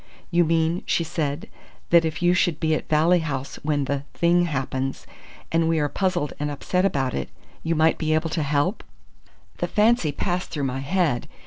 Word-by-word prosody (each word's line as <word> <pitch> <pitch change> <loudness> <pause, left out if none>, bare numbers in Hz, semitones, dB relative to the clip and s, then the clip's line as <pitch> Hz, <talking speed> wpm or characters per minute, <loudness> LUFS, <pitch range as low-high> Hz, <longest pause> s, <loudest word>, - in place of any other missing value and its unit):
"You 175 0 +4
mean," 165 +2 +1
she 170 - +1
said, 155 -2 -3 0.4
"that 170 -1 +6
if 160 +2 -3
you 175 0 +5
should 175 -4 +1
be 160 -1 +1
at 155 - -3
Valley 160 +4 +4
House 140 -4 -4
when 145 -2 0
the 140 0 -1
thing 175 +1 +3
happens, 135 -3 -3 0.5
and 165 0 +2
we 165 - +2
are 145 -1 +1
puzzled 180 -5 -1
and 150 0 -1
upset 180 +6 -1
about 135 -9 0
it, 70 - -3 0.3
you 165 +1 -1
might 160 +1 +3
be 155 -1 +1
able 160 0 -1
to 160 - -1
help?" 145 +7 0 0.7
"The - - -1
fancy 215 -7 +3
passed 180 +4 -2
through 145 - -3
my 135 0 -2
head. 150 -3 0
160 Hz, 190 wpm, -24 LUFS, 145-175 Hz, 0.7 s, that